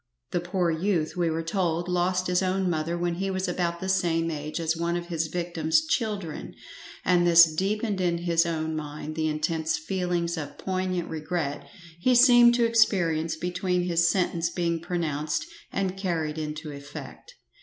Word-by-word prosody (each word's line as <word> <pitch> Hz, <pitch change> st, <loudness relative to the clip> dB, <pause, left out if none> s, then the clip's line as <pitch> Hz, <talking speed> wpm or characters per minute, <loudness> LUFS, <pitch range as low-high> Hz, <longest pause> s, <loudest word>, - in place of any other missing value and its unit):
The 175 Hz, -, +1 dB
poor 175 Hz, 0 st, 0 dB
youth, 165 Hz, -1 st, 0 dB
we 175 Hz, -2 st, +1 dB
were 165 Hz, +1 st, -2 dB
told, 170 Hz, 0 st, -1 dB
lost 180 Hz, +1 st, +1 dB
his 180 Hz, 0 st, +1 dB
own 190 Hz, 0 st, 0 dB
mother 165 Hz, 0 st, -1 dB
when 175 Hz, 0 st, -1 dB
he 195 Hz, +3 st, -2 dB
was 190 Hz, 0 st, -2 dB
about 170 Hz, -1 st, -1 dB
the 190 Hz, -, -4 dB
same 165 Hz, -3 st, +1 dB
age 150 Hz, +1 st, -4 dB
as 165 Hz, 0 st, 0 dB
one 170 Hz, +1 st, -1 dB
of 175 Hz, 0 st, -6 dB
his 165 Hz, -2 st, -1 dB
victim's 170 Hz, -, 0 dB
children, 210 Hz, -, -3 dB, 0.5 s
and 175 Hz, -1 st, +4 dB
this 170 Hz, -2 st, +7 dB
deepened 200 Hz, +3 st, -1 dB
in 175 Hz, -1 st, +1 dB
his 170 Hz, -1 st, +2 dB
own 160 Hz, -1 st, -2 dB
mind 150 Hz, 0 st, -5 dB
the 160 Hz, 0 st, 0 dB
intense 160 Hz, +1 st, -1 dB
feelings 175 Hz, 0 st, -2 dB
of 145 Hz, -2 st, -7 dB
piognant 185 Hz, -2 st, -2 dB
regret 155 Hz, -2 st, -3 dB, 0.3 s
he 250 Hz, +8 st, +3 dB
seemed 240 Hz, -1 st, +7 dB
to 240 Hz, -1 st, +3 dB
experience 175 Hz, -8 st, +2 dB
between 180 Hz, +1 st, -1 dB
his 170 Hz, -1 st, +2 dB
sentence 170 Hz, -2 st, 0 dB
being 170 Hz, -1 st, -1 dB
pronounced 155 Hz, -4 st, -2 dB, 0.3 s
and 190 Hz, -1 st, -1 dB
carried 165 Hz, -5 st, -2 dB
into 150 Hz, 0 st, -5 dB
effect. 145 Hz, -, -10 dB
170 Hz, 165 wpm, -26 LUFS, 160-185 Hz, 0.5 s, this